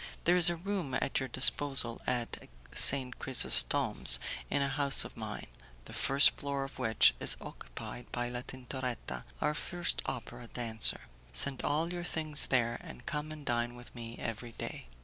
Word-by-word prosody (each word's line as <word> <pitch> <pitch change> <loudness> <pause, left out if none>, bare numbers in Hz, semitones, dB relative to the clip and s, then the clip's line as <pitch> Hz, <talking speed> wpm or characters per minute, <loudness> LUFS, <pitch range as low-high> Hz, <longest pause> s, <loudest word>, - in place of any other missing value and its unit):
There 175 - +2
is 175 -1 +8
a 175 - -3
room 175 -6 -5
at 135 - -2
your 130 -1 -6
disposal 130 -1 +4
at 120 -2 -5 0.2
St. 130 -2 +6
Chrysostom's, 125 - +4 0.3
in 140 - -1
a - - -2
house 140 0 +1
of - - -12
mine, - - -8 0.4
the - - -13
first 140 +2 +4
floor 140 -1 -5
of 135 0 -11
which 115 -3 +3
is - - +1
occupied - - -11
by 120 0 -4
La 120 0 -6
Tintoretta, 125 -1 -7 0.2
our 150 - 0
first 175 +3 -5
opera 125 -2 -8
dancer. 115 -2 +1 0.3
Send 125 - +2
all 160 +4 -2
your 175 -1 -6
things 155 -3 0
there, 120 -2 -1
and 170 -2 -13
come 150 +1 -5
and 155 -2 -10
dine 120 0 -3
with 120 0 -14
me 115 -1 -10
every 115 +1 -7
day. - - -9
130 Hz, 170 wpm, -30 LUFS, 120-145 Hz, 0.4 s, is